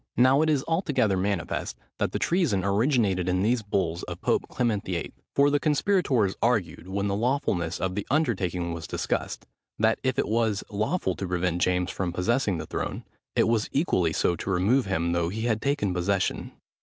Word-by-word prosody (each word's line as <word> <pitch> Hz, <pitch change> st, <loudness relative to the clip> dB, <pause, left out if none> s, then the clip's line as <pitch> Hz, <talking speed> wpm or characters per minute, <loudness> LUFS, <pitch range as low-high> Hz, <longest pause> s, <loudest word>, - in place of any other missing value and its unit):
Now 130 Hz, +3 st, +5 dB
it 155 Hz, -, +2 dB
is 145 Hz, -3 st, +1 dB
altogether 160 Hz, -, +1 dB
manifest, 95 Hz, -2 st, -2 dB, 0.2 s
that -, -, 0 dB
the -, -, -1 dB
treason 160 Hz, -, +1 dB
originated 100 Hz, -, +1 dB
in 90 Hz, +1 st, +1 dB
these 120 Hz, +2 st, +2 dB
bulls 95 Hz, -5 st, -1 dB
of -, -, -7 dB
Pope -, -, 0 dB
Clement 110 Hz, -5 st, 0 dB
VIII.; 85 Hz, -3 st, -4 dB, 0.2 s
for 140 Hz, +1 st, +4 dB
the 145 Hz, -, +2 dB
conspirators 145 Hz, -, +2 dB
argued, 100 Hz, -8 st, 0 dB
when 100 Hz, +1 st, -2 dB
the 100 Hz, -, 0 dB
lawfulness 110 Hz, -, 0 dB
of 95 Hz, 0 st, -1 dB
the 105 Hz, +1 st, -4 dB
undertaking 95 Hz, -, 0 dB
was 85 Hz, -1 st, -6 dB
discussed, -, -, -3 dB, 0.3 s
that 110 Hz, +1 st, +2 dB
if 130 Hz, -1 st, -1 dB
it -, -, +1 dB
was 110 Hz, -2 st, +1 dB
lawful 105 Hz, -, 0 dB
to 95 Hz, -, -3 dB
prevent 90 Hz, -1 st, -1 dB
James 90 Hz, 0 st, +1 dB
from 95 Hz, -2 st, -2 dB
possessing 100 Hz, +2 st, 0 dB
the 75 Hz, -, -5 dB
throne, -, -, -4 dB, 0.3 s
it -, -, +3 dB
was 115 Hz, -1 st, +1 dB
equally 95 Hz, -, +1 dB
so 85 Hz, -, +1 dB
to 95 Hz, -, -5 dB
remove 95 Hz, +7 st, +2 dB
him 85 Hz, -3 st, 0 dB
though 85 Hz, -1 st, 0 dB
he 110 Hz, +4 st, -4 dB
had 110 Hz, -2 st, 0 dB
taken 140 Hz, -9 st, 0 dB
possession. 95 Hz, +2 st, -1 dB
100 Hz, 185 wpm, -26 LUFS, 90-125 Hz, 0.3 s, Now